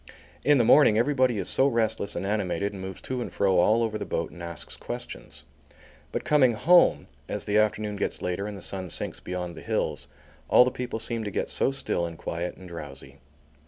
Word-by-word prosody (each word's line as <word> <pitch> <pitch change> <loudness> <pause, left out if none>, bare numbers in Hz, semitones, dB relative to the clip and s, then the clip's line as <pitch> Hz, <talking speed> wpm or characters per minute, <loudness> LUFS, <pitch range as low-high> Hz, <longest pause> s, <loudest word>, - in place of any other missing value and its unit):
In 145 0 +5
the 120 - +4
morning 110 -2 +6
everybody 130 -1 +2
is - - -2
so 135 - +3
restless 110 -5 0
and 90 - -3
animated 100 0 -1
and 95 - -7
moves 95 -1 -6
to 130 -1 -3
and - - -5
fro 95 -3 +2
all 110 +6 +4
over 110 -1 -2
the - - -3
boat - - -2
and 85 - -12
asks 85 -2 -6
questions. - - -8 0.7
But - - -3
coming 135 -5 +4
home, 175 +10 +4 0.2
as - - -4
the 105 +1 +3
afternoon 105 -1 0
gets - - -2
later 90 +3 -2
and 105 -1 -6
the 95 - -9
sun 95 -2 -3
sinks - - -3
beyond 90 -1 -5
the - - -10
hills, - - -2 0.4
all 125 - +7
the 125 - 0
people 125 -2 -4
seem 115 0 -3
to 105 - -3
get 95 - -2
so - - +1
still 135 -10 -2
and 85 -1 -9
quiet 85 +2 -4
and 95 - -11
drowsy. 70 -5 -9
105 Hz, 210 wpm, -27 LUFS, 90-120 Hz, 0.7 s, all